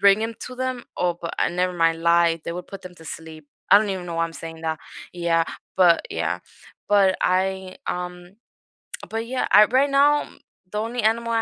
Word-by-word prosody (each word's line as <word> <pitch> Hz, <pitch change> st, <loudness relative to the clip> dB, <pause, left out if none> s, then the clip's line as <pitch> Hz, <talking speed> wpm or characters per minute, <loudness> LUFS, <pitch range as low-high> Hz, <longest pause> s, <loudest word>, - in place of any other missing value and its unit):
bring 200 Hz, +2 st, +5 dB
'em 225 Hz, 0 st, -3 dB
to 255 Hz, -, -8 dB
them. 255 Hz, -1 st, -3 dB
Oh, 175 Hz, -1 st, +1 dB
but 170 Hz, -, -5 dB
I -, -, +2 dB
never 180 Hz, +1 st, 0 dB
mind 165 Hz, -1 st, +1 dB
lie, 170 Hz, 0 st, +3 dB
they -, -, -3 dB
would 180 Hz, +1 st, -7 dB
put 195 Hz, -1 st, -9 dB
them 180 Hz, -1 st, -10 dB
to 165 Hz, -, -14 dB
sleep. 160 Hz, -1 st, -9 dB, 0.2 s
I -, -, +10 dB
don't 210 Hz, -1 st, -1 dB
even 185 Hz, -2 st, -4 dB
know 170 Hz, -, -5 dB
why 165 Hz, 0 st, +1 dB
I'm 165 Hz, -, -6 dB
saying 165 Hz, 0 st, -8 dB
that. 160 Hz, -1 st, -2 dB, 0.3 s
Yeah, 170 Hz, -1 st, +1 dB, 0.3 s
but 175 Hz, -3 st, +4 dB
Yeah. -, -, -1 dB, 0.5 s
But 195 Hz, -2 st, +4 dB
I, 190 Hz, 0 st, 0 dB
um 180 Hz, +1 st, -5 dB, 0.7 s
but 225 Hz, +1 st, -3 dB
yeah, 255 Hz, +1 st, -1 dB
I 210 Hz, +1 st, +8 dB
right 260 Hz, +5 st, +2 dB
now 285 Hz, +2 st, +4 dB
m -, -, -15 dB, 0.3 s
the 210 Hz, -, -4 dB
only 230 Hz, +3 st, -2 dB
animal 230 Hz, +1 st, +1 dB
I 225 Hz, -, +2 dB
185 Hz, 210 wpm, -23 LUFS, 170-220 Hz, 0.7 s, I